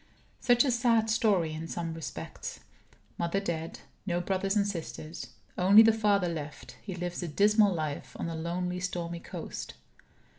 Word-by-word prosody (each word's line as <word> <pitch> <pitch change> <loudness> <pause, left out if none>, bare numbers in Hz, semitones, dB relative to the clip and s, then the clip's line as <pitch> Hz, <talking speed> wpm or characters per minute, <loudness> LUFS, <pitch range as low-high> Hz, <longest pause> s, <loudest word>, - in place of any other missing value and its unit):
Such 245 +1 +4
a 265 - +2
sad 230 -2 +3
story, 195 -9 +2
in 160 +1 -5
some 165 -1 -3
respects. 160 -1 -6 0.6
Mother 170 +3 +1
dead; 165 -4 -4 0.3
no 175 -1 +1
brothers 195 +3 0
or 200 - +3
sisters. 165 -4 -5 0.3
Only 200 +5 +8
the 225 0 +6
father 205 -4 +2
left; 155 -3 -6
he 190 -4 -6
lives 175 0 -4
a 175 - -3
dismal 205 +5 +4
life 155 -4 -3
on - - -2
a 165 - -3
lonely 180 +2 -2
stormy 175 -2 -3
coast. - - -7
180 Hz, 155 wpm, -30 LUFS, 170-205 Hz, 0.6 s, Only